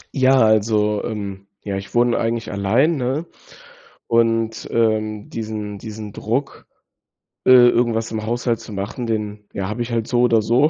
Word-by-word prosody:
Ja, 130 -1 +4
also, 105 -1 +2
ähm, 100 -3 -5 0.2
ja, 100 -1 -3
ich 95 +3 -7
wohne 120 0 +3
eigentlich 115 0 -2
allein, 115 +11 +2
ne? 135 +5 -1 0.8
Und, 115 -1 +1
ähm, 110 -2 0
diesen 105 -2 -5
diesen 110 -1 -8
Druck, 130 +6 -3 0.8
äh, - - +6
irgendwas 120 -2 +5
im 110 -1 -3
Haushalt 120 0 -1
zu 110 - -10
machen, 100 +6 -4
den, 105 -2 -3
ja, 95 -1 -3
habe 110 +3 -4
ich 120 +1 -3
halt 115 -1 -1
so 120 - +1
oder 115 -2 +4
so 125 +7 +3
110 Hz, 155 wpm, -20 LUFS, 105-120 Hz, 0.8 s, äh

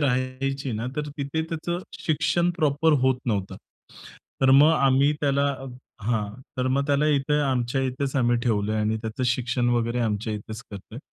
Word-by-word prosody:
राहायची 135 0 -1
ना, 110 +2 -3
तर 150 0 -2
तिथे 140 +3 -2
त्याचं 170 +2 -3 0.2
शिक्षण 170 +1 +1
प्रॉपर 155 0 +2
होत 130 -1 +3
नव्हतं. 100 -5 -2 0.8
तर 135 0 +5
मग 145 +4 +7
आम्ही 140 -1 +3
त्याला 140 0 +2 0.6
हां, 105 -2 -1 0.2
तर 125 - 0
मग 140 +2 +1
त्याला 145 +1 +2
इथे 150 0 +2
आमच्या 130 -2 0
इथेच 130 +1 -2
आम्ही 120 -2 +3
ठेवलंय 110 -2 0
आणि 110 +1 0
त्याचं 110 +3 -4
शिक्षण 125 0 0
वगैरे 120 0 0
आमच्या 110 -1 -1
इथेच 110 +2 -7
करतोय. 105 +3 -9
130 Hz, 155 wpm, -25 LUFS, 115-145 Hz, 0.8 s, मग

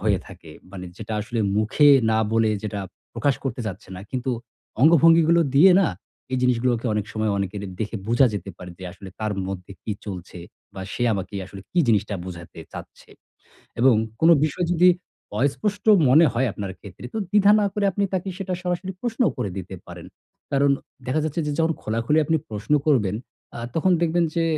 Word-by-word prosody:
হয়ে - - +2
থাকে। 80 - -13 0.2
মানে 95 -2 -7
যেটা 110 +1 -7
আসলে 115 +2 -3 0.2
মুখে 110 +7 +4 0.2
না 110 - +2
বলে 115 -1 +3
যেটা 105 -1 -3 0.3
প্রকাশ 145 -2 +1
করতে 130 -2 -3
চাচ্ছে 95 -3 -7
না। - - -8
কিন্তু 130 0 -2 0.5
অঙ্গভঙ্গিগুলো 165 +2 +6
দিয়ে 180 +7 +7
না, 195 - +3 0.5
এই 130 - +1
জিনিসগুলোকে 125 -1 +1
অনেক 105 -1 -1
সময় 110 0 -1
অনেকের 100 +1 -3 0.2
দেখে 110 +1 -3
বুঝা 120 +3 +5
যেতে 100 -1 -5
পারে 90 - -9
যে 95 - -9
আসলে 95 0 -11
তার 110 -1 -1 0.2
মধ্যে 95 0 -6
কি 110 - -3
চলছে? 90 -2 -7 0.4
বা - - -7
সে - - -3
আমাকে 95 0 -5
আসলে 95 +1 -10
কী 175 - 0
জিনিসটা 105 -2 +2
বুঝাতে 85 -2 -9
চাচ্ছে? - - -11 0.7
এবং 130 -1 +6 0.3
কোনো 165 +1 +6
বিষয় 165 +3 -1
যদি 175 +1 +5 0.5
অস্পষ্ট 200 - -1 0.2
মনে 155 +6 +6
হয় 125 +3 +1
আপনার 100 -2 -5
ক্ষেত্রে 100 +3 -12
তো 220 - -1
দ্বিধা 205 0 +5
না 205 - +2
করে 205 - 0
আপনি 200 - 0
তাকে 185 +1 -2
সেটা 190 -2 -4
সরাসরি 180 +1 -2
প্রশ্নও 240 0 +1
করে 100 - -2
দিতে 95 0 -6
পারেন। - - -10 0.5
কারণ 140 0 +3 0.4
দেখা 140 +5 0
যাচ্ছে 155 +2 -2
যে 150 - -1
যখন 165 0 +2
খোলাখুলি 115 +8 0
আপনি 160 +2 +2
প্রশ্ন 105 +5 -4 0.2
করবেন 105 -9 +2 0.4
আ - - -6 0.2
তখন 180 +3 +2
দেখবেন 170 0 +2
যে 165 - +1
125 Hz, 180 wpm, -23 LUFS, 105-165 Hz, 0.7 s, দিয়ে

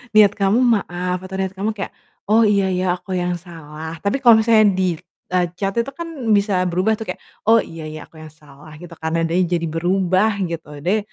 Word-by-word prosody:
niat 210 -2 +7
kamu, 200 +3 +2 0.2
"Maaf", 180 0 -3
atau 190 0 -7
niat 190 0 -2
kamu 195 +3 -2
kayak, 195 - -4 0.4
"Oh, 220 +2 +5
iya 200 -2 +2
ya, 185 +1 -1
aku 190 +1 -7
yang 180 0 -1
salah," 160 -1 -9
tapi 200 +7 +1
kalau 230 -2 +8
misalnya 220 -1 +5
di, 185 -2 0 0.4
eee, 180 -1 +2
chat 195 +1 -2
itu 255 +4 -2
kan 340 - -6 0.3
bisa 200 -2 +1
berubah 185 +5 +1
tuh 220 - -5
kayak, - - -25 0.3
"Oh 230 +1 +6
iya 165 -1 -9
ya, 155 0 -7
aku 160 - -16
yang 155 -1 -11
salah," 150 0 -16
gitu 175 -1 -11
kan, 160 0 -3
nadanya 165 +2 +1
jadi 170 -1 -1
berubah 185 +5 +1
gitu 155 -3 -7
deh, 195 +6 +2
185 Hz, 205 wpm, -20 LUFS, 165-200 Hz, 0.4 s, kalau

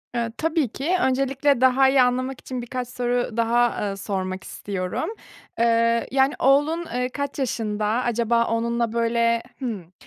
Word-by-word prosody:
Eee, 235 -1 -1
tabii 320 -3 +1
ki 275 +9 -3
öncelikle 270 0 +1
daha 260 +1 +5
iyi 265 -1 +4
anlamak 255 +1 0
için 255 -1 -5
birkaç 245 +1 -4
soru 245 -1 -2
daha, 235 -1 +2
eee, 195 - -4
sormak 190 -1 -4
istiyorum. 185 - -4 0.5
Eee, 230 0 +2
yani, 270 +2 +3
oğlun, 295 +6 +3
eee, 250 0 -1
kaç 285 +2 -4
yaşında, 215 -5 -2
acaba 235 0 +1
onunla 235 0 -1
böyle 235 0 +1 0.2
Hımm. 210 - -5
240 Hz, 145 wpm, -23 LUFS, 230-265 Hz, 0.5 s, daha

